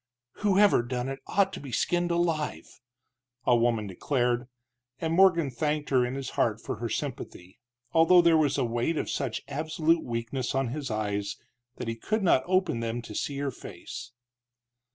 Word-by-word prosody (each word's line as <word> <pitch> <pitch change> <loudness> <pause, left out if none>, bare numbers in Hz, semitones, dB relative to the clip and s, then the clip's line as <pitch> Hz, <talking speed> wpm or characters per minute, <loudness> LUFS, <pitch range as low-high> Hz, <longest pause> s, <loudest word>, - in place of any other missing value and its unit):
"Whoever 205 -5 +4
done 125 +1 -3
it 135 0 -5
ought 195 -1 +2
to - - -5
be 140 -3 -9
skinned 175 +8 +1
alive!" 165 - -1 0.7
a 125 - +5
woman 115 -2 +2
declared, 120 +5 -1 0.5
and 160 0 -1
Morgan 170 -5 +4
thanked 150 +4 -2
her 130 -2 +4
in 125 +2 -2
his 135 -1 -5
heart - - +1
for - - -5
her - - -3
sympathy, 90 +5 -5 0.3
although 170 +2 +6
there 170 -1 +5
was 150 -3 +2
a 135 - +1
weight 120 +7 -1
of - - -2
such 130 -5 -2
absolute 160 +3 +1
weakness 120 +3 -3
on 135 -2 +1
his 140 +2 -4
eyes 105 -2 -2 0.4
that - - -6
he 115 - -2
could 215 - -2
not 165 -7 +4
open 185 -9 +1
them 115 +1 -3
to 110 - -9
see 140 +6 -3
her 140 -1 -1
face. 120 +5 -9
135 Hz, 175 wpm, -28 LUFS, 120-165 Hz, 0.7 s, although